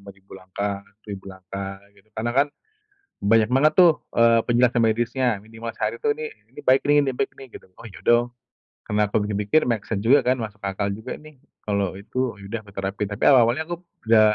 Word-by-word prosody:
5000 100 0 -15
langkah, 100 +2 -4 0.2
1000 100 -2 -8
langkah, 95 +1 -7 0.2
gitu. 100 +1 -25
Karena 120 +2 -1
kan, 140 +3 +3 0.7
banyak 110 +2 +3
banget 145 +4 +4
tuh, 180 -2 +8 0.2
eee, 115 0 +5
penjelasan 120 0 +3
medisnya, 120 +3 +1 0.2
minimal 115 +1 -7
sehari 110 +2 -2
tuh, 145 - +1
"nih 155 0 -5 0.2
ini - - -12
baik 130 +1 +4
nih 145 0 +5
nih 135 -2 -2
baik 135 - -1
nih" 135 - -11
gitu - - -12
oh 115 - -13
ya 95 - -13
dong. 120 +1 +4 0.6
Kenapa 105 0 0
mikir-mikir, 105 +7 +1
make 115 -4 0
sense 100 -3 -2
juga 135 +5 +6
kan, 130 +1 +3
masuk 105 -3 -6
akal 100 0 -2
juga 110 +2 -6
nih, 155 -2 -16 0.3
kalau 100 -3 0
itu, 115 +4 -3
ya 100 - -12
udah, 115 0 -3
aku - - -13
terapin. 95 +1 -2
Tapi 100 - -7
awal-awalnya 125 +3 +4
aku 175 - -4 0.3
udah, 110 -1 +5
110 Hz, 195 wpm, -23 LUFS, 100-125 Hz, 0.7 s, tuh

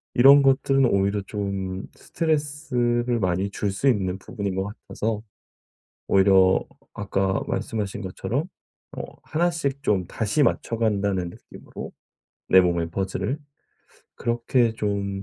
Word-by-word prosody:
이런 140 +3 +8
것들은 135 0 +3
오히려 100 -2 +2
좀 95 -2 -3
스트레스를 125 -6 -1
많이 95 0 0
줄 100 0 -2
수 135 +8 +2
있는 95 -6 0
부분인 100 -2 -4
것 95 0 -1 0.2
같아서 110 -1 -2 0.9
오히려 95 0 +5
어 95 0 +5 0.3
아까 95 -1 0
말씀하신 105 -2 -3
것처럼 115 +9 -2 0.5
뭐 - - -8
1 170 +3 +1
씩 140 -4 -2
좀 95 -3 +2
다시 115 +7 0
맞춰간다는 100 -7 0
느낌으로 - - -10 0.6
내 95 - +8
몸의 85 -2 0
퍼즐을 95 - -2 0.8
그렇게 120 0 +1
좀 100 -2 -2
105 Hz, 250 characters per minute, -24 LUFS, 95-125 Hz, 0.9 s, 이런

